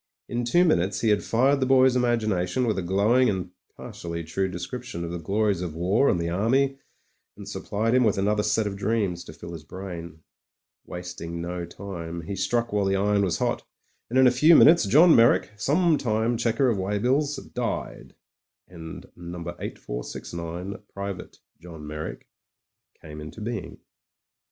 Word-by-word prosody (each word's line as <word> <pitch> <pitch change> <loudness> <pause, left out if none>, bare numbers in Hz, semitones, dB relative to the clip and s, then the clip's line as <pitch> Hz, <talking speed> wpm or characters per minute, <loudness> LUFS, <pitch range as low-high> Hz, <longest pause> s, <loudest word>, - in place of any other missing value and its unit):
In 120 0 -2
two 175 +9 +4
minutes 95 - +1
he 115 - +2
had 105 -1 +2
fired 135 +5 +2
the 130 - +1
boy's 130 -1 +5
imagination 115 -4 +1
with 110 -4 0
a - - -1
glowing 105 +8 +3
and 95 -3 -3 0.3
partially 85 -1 -6
true 95 +4 -1
description 90 +1 -6
of 85 - -4
the 85 - -4
glories 100 +2 0
of 85 -4 -4
war 95 +11 +2
and 90 - +1
the 85 - -2
army, 135 +8 +1 0.6
and 100 -1 -10
supplied 105 +3 -2
him 130 0 +4
with 110 -4 +2
another 105 +2 +1
set 105 +1 +1
of 100 -1 -3
dreams 100 -4 -1
to - - -9
fill 85 +3 -10
his 80 -2 -8
brain. 85 -2 -8 0.6
Wasting 90 -1 -6
no 85 0 -4
time, 85 -3 -7
he 90 +5 -5
struck 115 +4 -1
while 105 -1 +1
the 95 0 +1
iron 100 +1 +2
was 95 -4 0
hot, - - -1 0.5
and 125 - 0
in 130 - +7
a 125 - +7
few 155 +7 +6
minutes 160 -9 +7
Johii 155 - +7
Meyrick, 115 -1 +4
sometime 125 - +1
checker 115 +3 +1
of 115 -5 +1
weigh 100 +2 -1
bills, 140 +7 +1 0.2
died, - - -4 0.5
and 80 -3 -9
No. 85 0 -8 0.2
8469, 85 +10 -6
Private 100 -1 -6 0.2
John 80 -3 -10
Meyrick, 75 +1 -6 0.8
came 75 0 -9
into 75 +8 -9
being.... 115 -2 -5
100 Hz, 165 wpm, -25 LUFS, 85-120 Hz, 0.8 s, in